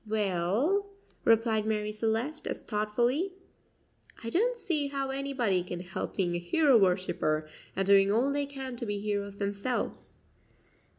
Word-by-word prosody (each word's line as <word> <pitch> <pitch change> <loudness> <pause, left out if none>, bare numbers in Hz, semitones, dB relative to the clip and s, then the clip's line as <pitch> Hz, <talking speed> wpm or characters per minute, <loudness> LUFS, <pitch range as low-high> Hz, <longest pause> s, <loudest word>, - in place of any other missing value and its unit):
"Well," 215 - +1 0.4
replied 225 -1 +3
Marie 210 -1 0
Celeste 225 +8 -1
as - - -4
thoughtfully, 240 - 0 0.9
"I 230 - -4
don't 480 - +2
see 320 -10 0
how 275 -1 -2
anybody 265 -9 0
can 175 0 -5
help 180 0 -5
being 180 -3 +1
a 175 - -1
hero 275 - +3
worshipper, 180 -6 +2 0.3
and 195 +2 0
doing 195 0 +5
all 250 +6 +2
they 285 0 0
can 265 -2 -6
to 235 - -4
be 205 0 -1
heroes 200 -1 -3
themselves." 200 +5 -3
220 Hz, 140 wpm, -29 LUFS, 200-275 Hz, 0.9 s, doing